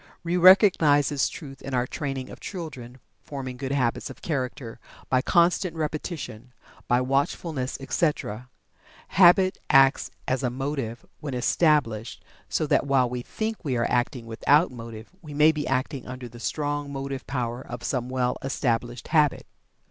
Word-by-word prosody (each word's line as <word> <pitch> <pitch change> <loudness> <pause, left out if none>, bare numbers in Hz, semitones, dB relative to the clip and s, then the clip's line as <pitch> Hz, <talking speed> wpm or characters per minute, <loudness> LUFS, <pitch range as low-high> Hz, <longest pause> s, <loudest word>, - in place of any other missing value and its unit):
We 170 +1 -1
recognize 175 -6 +6
this 145 -3 +1
truth 135 -5 -10
in 135 -1 -4
our 125 0 +1
training 135 -1 -4
of - - -10
children, 135 - -7 0.2
forming 130 -3 -6
goods 135 +2 -3
habits 120 -4 0
of - - -12
character 130 -5 -3 0.3
by 130 -1 +3
constant 175 +2 +2
repetition, 150 - -5 0.3
by 125 +1 +3
watchfulness, 135 +1 -1
etc. 135 - -2 0.6
Habit 185 +1 +5
acts 135 0 +5 0.2
as 130 +1 0
a 125 - 0
motive 130 -3 -4
when 140 -4 -5
established, 125 -4 +1 0.3
so - - 0
that - - +2
while 130 -3 +3
we 125 -1 -3
think 220 - -3
we 135 -6 -1
are 115 - +1
acting 120 0 0
without 140 +8 +3
motive 115 -2 -9
we 150 -4 -9
may 150 +2 +6
be 150 -2 -4
acting 130 +1 -2
under 125 -1 -7
the 120 0 -12
strong 145 +2 -2
motive 135 -1 -5
power 125 -1 -3
of 120 -1 -8
some 125 -2 -2
well 125 -1 -1
established 120 -3 -2
habit. 150 -3 +2
135 Hz, 155 wpm, -26 LUFS, 125-150 Hz, 0.6 s, recognize